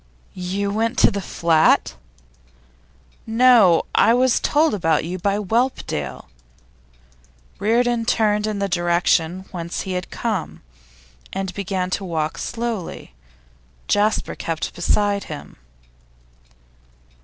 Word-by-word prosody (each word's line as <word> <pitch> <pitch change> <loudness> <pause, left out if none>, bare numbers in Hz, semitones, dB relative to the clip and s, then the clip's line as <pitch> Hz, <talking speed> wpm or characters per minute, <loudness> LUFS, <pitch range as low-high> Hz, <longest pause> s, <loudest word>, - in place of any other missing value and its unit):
'You 190 +2 -3
went 225 +3 -1
to - - +5
the 200 - -3
flat?' 165 - +2 1.3
'No, 225 -7 +5
I 230 - +5
was 255 0 +3
told 305 -2 +2
about 165 -6 +1
you 180 +2 -5
by 200 +3 0
Whelpdale.' 220 - -2 1.3
Reardon 235 +2 +1
turned 210 -2 +1
in 215 -1 -2
the 200 0 -1
direction 175 0 +1
whence 170 -2 -4
he 190 - -5
had 180 -1 -3
come, 210 - -4 0.7
and 195 -1 -4
began 190 -2 -3
to 195 - -2
walk 160 -4 -3
slowly; 230 - -5 0.7
Jasper 210 +1 +1
kept 165 -1 -4
beside 200 +3 0
him. 150 - -9
200 Hz, 110 wpm, -21 LUFS, 175-225 Hz, 1.3 s, to